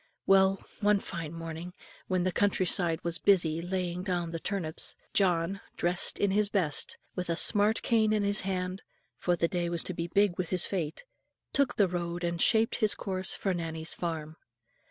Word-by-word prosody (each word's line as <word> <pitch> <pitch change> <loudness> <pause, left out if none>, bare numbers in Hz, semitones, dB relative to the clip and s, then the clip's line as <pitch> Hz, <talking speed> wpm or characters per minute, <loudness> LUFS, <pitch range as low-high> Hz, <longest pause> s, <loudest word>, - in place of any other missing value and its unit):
Well, 195 0 +4 0.2
one 210 -1 +3
fine 165 -5 -6
morning, 165 +1 -7 0.3
when 185 -1 0
the 185 - +1
country 195 0 +1
side 170 -2 +3
was 170 -2 -1
busy 165 -2 +2
laying 180 0 -3
down 175 -3 -2
the 165 - -4
turnips, 170 -4 -2 0.2
John, 185 0 +1 0.2
dressed 175 +1 +1
in 200 - +1
his 205 +1 +2
best, 175 -8 -1 0.2
with 180 -1 -4
a 170 - +1
smart 210 +4 +3
cane 220 -2 +2
in 215 -1 +1
his 200 +1 +3
hand, 185 0 -3 0.4
for 175 - +1
the 170 0 +1
day 175 -1 -2
was 170 -1 -1
to 185 - -4
be 170 0 -3
big 195 0 +1
with 180 -2 -2
his 180 -2 +2
fate, 165 -6 -3 0.5
took 275 -3 +3
the 200 - +3
road 175 0 -4
and 170 0 -1
shaped 225 +1 +3
his 215 -3 +2
course 185 -1 -2
for 195 - -1
Nannie's 165 -1 -2
farm. 160 -2 -4
180 Hz, 185 wpm, -29 LUFS, 170-195 Hz, 0.5 s, Well